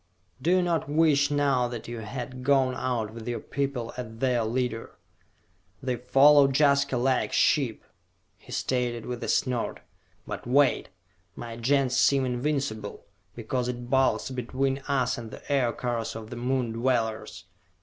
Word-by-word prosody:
"Do 160 - 0
you 185 +1 +4
not 165 -5 -1
wish 145 -2 +3
now 140 -4 +2
that 120 -2 -7
you 120 0 -5
had 125 +3 -6
gone 135 -1 +3
out 120 -5 -2
with 115 0 -9
your 120 -1 -2
people 135 -4 -3
as 110 -3 -7
their 125 -1 +1
leader?" 115 0 -2 0.9
"They 130 -1 0
follow 140 +3 +6
Jaska 140 -1 +3
like 130 +1 +1
sheep," 130 -7 +2 0.6
he - - -15
stated 120 -3 -1
with 125 -1 -5
a - - -3
snort. 125 -3 0 0.4
"But - - -6
wait! 140 +2 +3 0.5
My 115 -1 -7
Gens 130 +2 +1
seem 135 -2 +4
invincible, 125 -4 -2 0.3
because 120 +2 -2
it 120 0 -5
bulks 130 0 +2
between 130 +2 -1
us 130 -4 0
and 115 -2 -8
the - - -11
Aircars 120 -3 -1
of 110 -1 -8
the - - -5
Moon 125 0 -1
Dwellers! 115 -2 -1
125 Hz, 150 wpm, -27 LUFS, 120-135 Hz, 0.9 s, follow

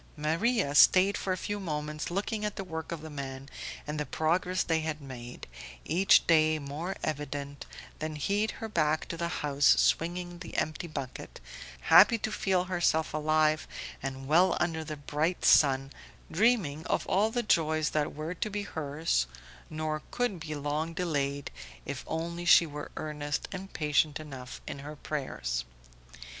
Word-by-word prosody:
Maria 165 - +1
stayed 185 +6 +6
for 190 - -2
a 185 - 0
few 205 +3 -3
moments 150 -4 -3
looking 205 +4 -2
at 210 -1 -2
the 195 - -4
work 160 -3 -6
of 165 -2 -4
the 160 - -8
men 135 -1 -6 0.4
and 150 +1 -4
the 150 - -1
progress 180 +3 +1
they 160 -1 +1
had 155 -1 -3
made, 125 -4 -9 0.4
each 185 +4 +5
day 155 -1 +4
more 150 +6 -5
evident, 145 -1 -4 0.3
then 155 0 -3
hied 200 +8 0
her 225 - -5
back 155 -6 +1
to 170 - -4
the 170 0 -2
house 145 -4 +3
swinging 175 +1 0
the 175 - -7
empty 155 +3 -1
bucket, 135 -5 -7 0.4
happy 205 - +7
to 220 0 -3
feel 190 -3 +1
herself 175 -3 +1
alive 155 0 +2 0.3
and 135 0 -5
well 175 +5 +4
under 160 -2 0
the 155 -1 -6
bright 150 +5 -1
sun, 135 -2 +5 0.4
dreaming 175 -6 +2
of - - 0
all 205 +3 +2
the 240 +1 -1
joys 155 -6 +2
that 150 -1 -1
were 155 +3 -4
to 195 +4 -3
be 205 0 -3
hers, 150 - -1 0.4
nor 155 -1 -3
could 245 -7 -1
be 155 -1 -5
long 150 +3 -2
delayed 145 -5 -1 0.3
if - - -5
only 170 +2 -3
she 175 -1 +7
were 150 -1 -7
earnest 150 -1 -3
and 190 0 -7
patient 150 0 +1
enough 135 -5 -8
in - - -6
her 150 +2 -8
prayers. 130 - -3
155 Hz, 160 wpm, -30 LUFS, 150-180 Hz, 0.4 s, happy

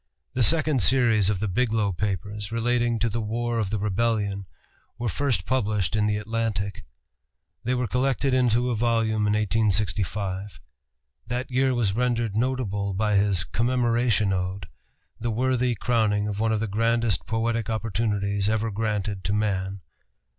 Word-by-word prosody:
The 130 - -1
second 155 0 +3
series 115 -4 +3
of 100 -3 0
the 110 - -1
"Biglow 110 -1 +1
Papers," 100 +2 -3
relating 120 0 +1
to 115 +1 0
the 115 +1 -2
War 115 +2 -1
of 105 -4 -1
the 105 - -1
Rebellion, 105 -1 -1 0.5
were 120 0 -2
first 130 +3 0
published 105 -6 0
in 105 -1 +2
the 105 0 +1
Atlantic. 105 -3 -3 0.8
They 125 +2 0
were 125 0 0
collected 130 +3 0
into 125 -1 +2
a - - 0
volume 110 -2 +1
in 105 - +2
1865. 100 -2 0 0.7
That 125 +2 -3
year 130 0 +2
was 110 -5 +1
rendered 120 -2 0
notable 110 -5 -1
by 105 +1 +1
his 100 -3 +2
"Commemoration 120 -3 +1
Ode," 95 +1 -3 0.5
the 120 - -2
worthy 125 +1 +1
crowning 105 -2 +1
of 105 -1 -3
one 110 0 +1
of 110 -1 0
the - - 0
grandest 115 +2 +1
poetic 115 0 -1
opportunities 105 -2 -1
ever 110 0 0
granted 105 -2 -2
to 100 - 0
man. 100 -2 -1
110 Hz, 150 wpm, -25 LUFS, 100-120 Hz, 0.8 s, second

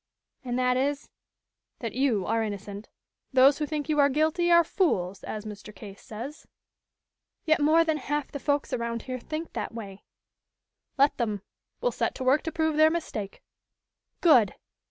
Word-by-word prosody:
"And 245 -1 -2
that 250 0 +2
is 280 +2 -1 0.4
" - - -57
"That 230 -3 -4
you 245 -7 +1
are 225 +1 +1
innocent. 205 -1 -6 0.4
Those 270 +2 +5
who 300 - -1
think 300 -2 -3
you 305 -2 +1
are 285 0 +6
guilty 315 +5 +1
are 340 0 +7
fools, 200 - 0
as 215 0 -6
Mr. 210 0 -9
Case 200 -2 -11
says." 235 +8 -8 1.0
"Yet 315 -1 +3
more 315 +3 +5
than 315 -2 0
half 295 0 -3
the 285 - -5
folks 285 +1 -1
around 235 -1 -2
here 255 -1 -5
think 310 +6 -6
that - - -4
way." 200 -4 -8 0.9
"Let 280 +1 +4
them. 215 -5 -2 0.4
We'll - - +1
set - - -2
to - - -5
work 265 +4 +4
to 325 - -2
prove 315 -1 0
their 310 0 +7
mistake." 265 -12 -4 0.8
"Good!" 250 - +5
265 Hz, 170 wpm, -27 LUFS, 220-310 Hz, 1.0 s, are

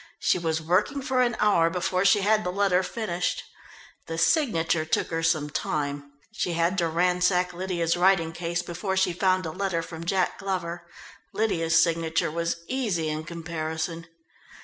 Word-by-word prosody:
She - - +1
was 160 -1 -1
working 190 - +1
for 260 -1 +1
an 240 -2 +2
hour 185 -6 +4
before 185 +2 0
she 200 +2 +5
had 215 +2 +3
the 180 - -2
letter 190 -1 +2
finished. 180 -2 -2 0.6
The 165 - -4
signature 165 - +2
took 160 - -1
her 165 0 -1
some 155 -3 +1
time. 145 -1 -3 0.2
She 180 -5 -2
had 170 +3 +1
to 170 - +2
ransack 180 +2 +1
Lydia's 175 -2 -1
writing 175 -2 +3
case 170 +1 -3
before 190 +3 -3
she 190 -2 +2
found 185 0 +1
a 160 - -3
letter 185 -2 -2
from 165 -1 -8
Jack 185 +1 0
Glover 175 -3 -4 0.5
Lydia's 165 -7 +2
signature 165 -1 0
was 170 +1 -2
easy 210 -12 -1
in 155 +1 -4
comparison. 165 0 -4
175 Hz, 160 wpm, -26 LUFS, 165-190 Hz, 0.6 s, she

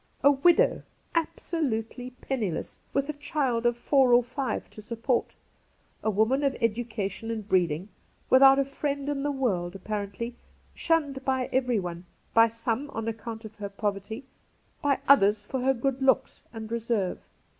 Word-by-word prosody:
A 285 - +8
widow, 345 - +4 0.3
absolutely 265 -8 -2
penniless, 215 -11 -3
with 275 0 0
a 300 - -2
child 270 -5 0
of 240 0 +1
four 260 0 +4
or 245 +1 +6
five 255 0 -3
to 215 - -10
support. 230 +3 -1 0.7
A 220 - +1
woman 220 +7 +2
of 275 -1 +1
education 225 -2 -2
and 220 -3 -4
breeding, 180 -3 +1 0.4
without 270 +1 +7
a 275 - +2
friend 280 0 -3
in 285 -1 -1
the 290 - 0
world, 195 -10 -1
apparently; 210 +4 -4 0.4
shunned 290 -5 0
by 260 -1 0
everyone 200 -10 0
— - - -39
by 230 0 +7
some 230 +4 -2
on 225 -4 -4
account 225 0 -5
of 220 0 -11
her 205 -1 -5
poverty, 205 +4 -3 0.6
by 285 -3 +2
others 210 -6 +5
for 260 +5 -3
her 265 +1 +3
good 270 +2 -1
looks 265 0 +2
and 225 -1 -8
reserve. 230 -5 -2
240 Hz, 155 wpm, -27 LUFS, 215-270 Hz, 0.7 s, A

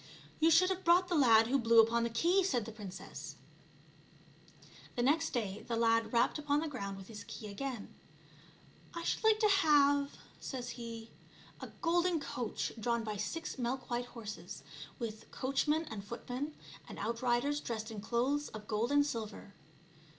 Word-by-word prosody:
" - - -23
You 320 +1 +5
should 365 +3 +6
have 380 0 -2
brought 355 +2 +5
the 350 - +1
lad 230 -6 +6
who 270 +4 +2
blew 230 -1 +5
upon 230 +1 +5
the 235 - 0
key," 345 +12 +3
said 250 - 0
the 225 - -6
princess. 200 -4 -8 1.6
The 240 - 0
next 320 +5 +3
day 215 -4 -3
the 235 - -1
lad 230 -1 +2
rapped 240 +5 +2
upon 295 0 +1
the 320 - -2
ground 200 -9 -5
with 190 -1 -10
his 215 -2 -8
key - - -8
again. 240 +1 -5 0.5
" - - -26
I 335 - -4
should - - -1
like 440 -1 +5
to - - +4
have/' 290 -8 +5 0.3
says 245 -3 -5
he, 230 -2 -7 0.3
" - - -22
a - - -5 0.2
golden 345 0 +2
coach 250 -6 -3
drawn 235 +1 0
by 215 -1 -4
six 260 +8 -4
milk 255 +1 -3
white 240 +1 0
horses, 225 -4 -8 0.3
with 220 -3 -6
coachman 295 +4 0
and 205 -3 -5
footman 250 +7 -5 0.3
and - - -8
out 230 +1 -3
riders 255 +4 +1
dressed 225 -4 -4
in 210 -2 -6
clothes 255 +7 0
of 210 -1 -9
gold 220 +4 0
and 285 0 +5
silver." 220 -6 -5
245 Hz, 180 wpm, -34 LUFS, 225-295 Hz, 1.6 s, should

